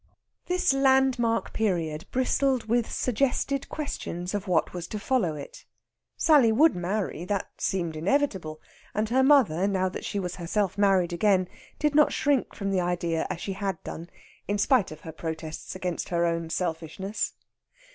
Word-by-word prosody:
This 360 -5 +2
landmark 265 -4 +2
period 165 -8 -1
bristled 260 0 +1
with 230 +1 0
suggested 275 +2 0
questions 180 - -4
of 205 0 -3
what 175 -3 +1
was 175 -2 -5
to 215 - -5
follow 200 -8 0
it. 140 -1 -9 0.5
Sally 285 -8 +5
would 300 +8 +5
marry 180 -1 -2
that 200 0 -2
seemed 170 -4 -1
inevitable; 185 - 0 0.4
and 215 +1 0
her 260 +3 +3
mother, 250 - +4
now 190 -2 +1
that - - -7
she - - -3
was 180 -2 -4
herself 190 +2 -1
married 190 -4 +3
again, 185 0 +3 0.3
did 300 -1 +1
not 300 0 +5
shrink 285 -3 0
from 200 -1 -2
the 190 -2 +2
idea 175 -2 -1
as 170 - -4
she 195 - -3
had 195 -2 -2
done, 170 +2 -7 0.4
in 205 - 0
spite 230 +1 +3
of 155 - -10
her 160 - -8
protests 160 +1 -6
against 180 -2 -3
her 170 -1 +1
own 165 -1 -1
selfishness. 175 +4 -3
195 Hz, 160 wpm, -27 LUFS, 170-245 Hz, 0.5 s, Sally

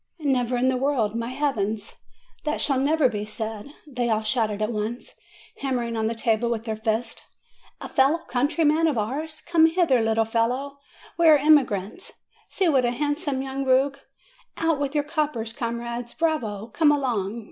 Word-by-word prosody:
"Never 250 -3 +1
in 255 +2 +2
the 260 - +1
world, 245 -5 0
by 230 - -3
Heavens! 225 -6 -2 0.5
That 300 0 -1
shall 275 -3 +1
never 295 +1 +3
be 210 -4 -3
said!" 220 +1 -4 0.2
they 250 -5 -2
all 220 -1 +1
shouted 215 -2 0
at 215 +2 -1
once, 220 +2 -4 0.5
hammering 245 -4 -2
on 220 -1 0
the 230 - -2
table 225 0 +1
\vith 225 -2 -2
their 220 -2 -3
fists. 220 +2 -2 0.6
"A - - -7
fellow 275 +5 +3
countryman 300 +5 +2
of 295 -6 0
ours! 295 +9 -3
Come 330 -2 +4
hither, 325 -7 +2
little 225 0 +2
fellow! 250 +5 -1 0.4
We 335 - +5
are 310 -1 +8
emigrants! 275 - +2 0.4
See 380 - 0
what 270 -5 +3
a 240 - +2
handsome 290 +1 -2
young 270 0 -4
rogue! 270 +1 +2 0.6
Out 325 -3 +1
with 285 0 -2
your 295 - +2
coppers, 290 -8 -2
comrades! 235 0 -4
Bravo! 235 -10 -1
Come 310 -3 +4
along! 235 -7 -1
250 Hz, 170 wpm, -24 LUFS, 225-290 Hz, 0.6 s, are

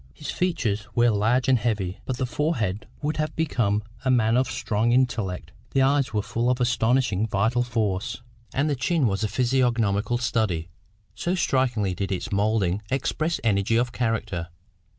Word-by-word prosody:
His 150 - -5
features 120 - -1
were 120 0 +4
large 115 +5 +2
and 130 -2 +4
heavy, 100 -4 -1
but 130 - -3
the 130 - 0
forehead 120 - -1 0.2
would 150 +2 -1
have 155 0 -2
become 110 -10 0 0.2
a 130 - 0
man 115 -3 +3
of 130 +1 +2
strong 110 0 0
intellect; 100 -10 0 0.2
the 135 - +5
eyes 135 -2 +2
were 105 -2 0
full 120 +3 -1
of 125 0 +1
astonishing 120 -3 +2
vital 110 +4 +1
force, 110 -3 -2 0.3
and 140 +3 0
the 145 - +1
chin 135 +4 +1
was 100 -1 0
a - - +2
physiognomical 120 -3 +1
study, 110 -9 -1 0.4
so 175 +2 -1
strikingly 125 - +1
did 95 +2 -3
its 95 +4 -3
moulding 100 -2 +1
express 155 +5 -1
energy 105 0 +2
of 120 +1 +1
character. 110 -8 -2
115 Hz, 165 wpm, -25 LUFS, 105-130 Hz, 0.4 s, the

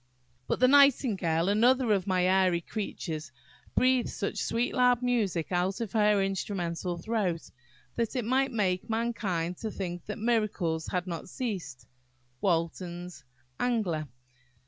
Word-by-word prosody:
"But - - -1
the 255 - +6
nightingale, 235 - +4
another 240 +4 +3
of 195 -2 +1
my 185 -2 +2
airy 185 -2 +3
creatures, 160 - -5 0.4
breathes 255 -1 +2
such 200 - -3
sweet 235 +2 0
loud 250 -1 +3
music 210 -10 0
out 180 +2 0
of 230 -4 -3
her 210 -2 +3
instrumental 180 -3 -2
throat, 185 -3 -2 0.5
that 230 0 -1
it 245 -4 -1
might 265 +3 +2
make 190 -5 0
mankind 200 -7 -1
to 220 - -4
think 175 -4 -5
that 210 - -4
miracles 210 -8 0
had 180 -1 -2
not 175 0 -6
ceased."–WALTON'S 165 - -4 0.4
Angler. 205 -11 0
195 Hz, 125 wpm, -29 LUFS, 170-230 Hz, 0.5 s, the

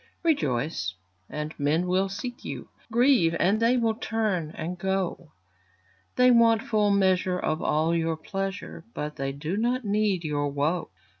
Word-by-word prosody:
Rejoice, 140 - 0 0.3
and 150 +1 -4
men 150 +5 +1
will 185 +2 +1
seek 245 +5 -6
you; - - -6 0.2
Grieve, 235 -9 +4
and 200 +5 +3
they 235 +2 +3 0.2
turn 210 -8 -1
and 170 +3 -4
go; 185 -3 -2 0.8
They 250 0 +6
want 230 -2 +5
full 215 -2 +2
measure 190 -2 +2
of 155 -3 -1
all 155 +2 +1
your 165 -1 0
pleasure, 195 +3 -5
But 150 0 -4
they 135 0 -2
do 150 +7 -4
not 245 +2 0
need 205 -3 +1
your 145 -2 -1
woe. 145 +5 -1
185 Hz, 145 wpm, -26 LUFS, 155-215 Hz, 0.8 s, They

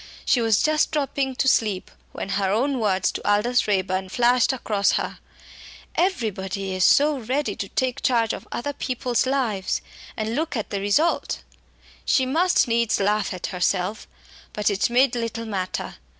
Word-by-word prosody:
She 250 - +3
was 225 -3 +3
just 310 0 +2
dropping 275 -3 -1
to 265 - 0
sleep 210 -7 +1 0.2
when - - -6
her 195 0 0
own 255 +6 +1
words 190 -4 +1
to - - -5
Aldous 230 +4 +2
Raeburn 190 -1 0
flashed 245 +4 +3
across 210 -6 0
her, - - -2 0.7
"Everybody 195 - -1
is 185 0 0
so 290 +7 +4
ready 260 +5 -2
to - - -4
take 260 -3 -1
charge 235 -4 +2
of - - -8
other 285 +4 -3
people's 250 -2 -1
lives, 240 -8 0 0.4
and 220 +1 -2
look 305 0 -2
at 220 - -4
the 200 -1 -2
result!" 250 +12 +1 0.6
She 260 - +2
must 330 +4 +2
needs 235 -1 +1
laugh 205 0 +1
at 180 -1 -5
herself, 180 +3 -1 0.5
but 210 0 +1
it 200 +3 +1
made 250 +1 +3
little 230 -1 -3
matter. 190 -4 -4
230 Hz, 160 wpm, -23 LUFS, 200-265 Hz, 0.7 s, so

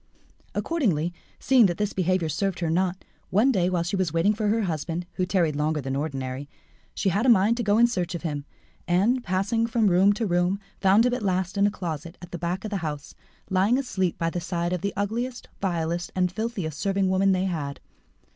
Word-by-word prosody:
Accordingly, 180 - 0 0.2
seeing 250 -5 +5
that 175 - -2
this 210 0 -1
behaviour 185 -2 +1
served 195 +4 -1
her 165 -2 0
naught, 185 +2 0 0.2
one 220 +8 +4
day, 180 -6 +2
while 180 -2 0
she 170 +3 -2
was 185 -4 0
waiting 165 +6 +3
for 215 0 -1
her 220 +2 +2
husband, 170 0 -3
who 185 -1 -1
tarried 170 -6 +1
longer 150 +1 0
than 135 -1 -3
ordinary, 135 -1 -4 0.5
she 195 - +1
had 200 +5 +1
a 260 - +3
mind 220 0 +5
to 240 - -1
go 205 0 +3
in 235 - +7
search 185 -6 -1
of 170 - -6
him, 145 -4 -3 0.4
and, 210 +9 +2
passing 200 +5 0
from 225 -4 +2
room 190 +3 +5
to 220 +2 -2
room, 180 +1 +1 0.2
found 200 +4 +5
him 250 - +2
at 250 - -2
last 185 -1 -1
in 200 0 +4
a - - +2
closet 170 -3 -5
at 175 0 -11
the 175 - -5
back 180 +4 -2
of 215 - -4
the 200 - 0
house, 150 -4 -5 0.4
lying 195 +6 +3
asleep 190 -10 -1
by 165 -1 -1
the 175 - -3
side 175 0 -2
of 180 - -2
the 200 - -1
ugliest, 235 +5 -3
vilest, 170 -2 -1
and 180 -1 +1
filthiest 190 -7 -3
serving 195 -1 +1
woman 190 +1 +3
they 185 0 +1
had. 150 -7 -3
185 Hz, 215 wpm, -25 LUFS, 170-205 Hz, 0.5 s, in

